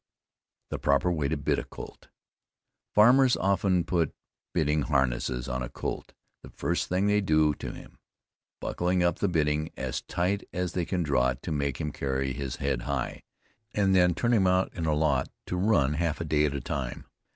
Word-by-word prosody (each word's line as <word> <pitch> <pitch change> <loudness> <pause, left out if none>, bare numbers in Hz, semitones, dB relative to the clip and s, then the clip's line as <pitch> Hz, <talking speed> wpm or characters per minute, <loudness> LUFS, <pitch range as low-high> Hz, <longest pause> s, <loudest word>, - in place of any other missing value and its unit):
THE - - -3
PROPER 70 +6 +2
WAY 75 -5 0
TO 80 - -1
BIT 70 - 0
A - - -4
COLT. - - -11 0.9
Farmers 125 +4 +6
often 95 -2 +2
put 85 -4 0 0.4
bitting 75 -2 +1
harness 65 -5 +1 0.2
on 65 0 -2
a - - -4
colt - - -5 0.3
the - - -11
first 85 - -2
thing 90 +2 +1
they 105 0 +3
do 80 -4 +3
to - - -6
him, - - -13 0.6
buckling 90 0 0
up 85 -2 +1
the 100 - +2
bitting 75 -3 +1
as 65 -2 -3
tight 95 +4 -1
as 90 -1 -2
they 90 -2 -1
can 90 -1 -1
draw 70 -5 +2
it 65 - -5
to - - -4
make 70 -3 -1
him 75 - -2
carry 65 -1 -2
his 65 0 -4
head 70 -3 -1
high, 70 -3 -2 0.5
and 100 -2 +3
then 90 -2 +4
turn 120 +6 +1
him 100 -5 +4
out 95 +1 +2
in 85 -3 -3
a 75 - +2
lot 75 -4 +1 0.2
to - - -3
run 90 -7 +2
a - - -3
half 85 -2 0
day 75 0 +3
at 70 -1 -1
a 70 - -3
time. - - -4
80 Hz, 195 wpm, -28 LUFS, 70-90 Hz, 0.9 s, Farmers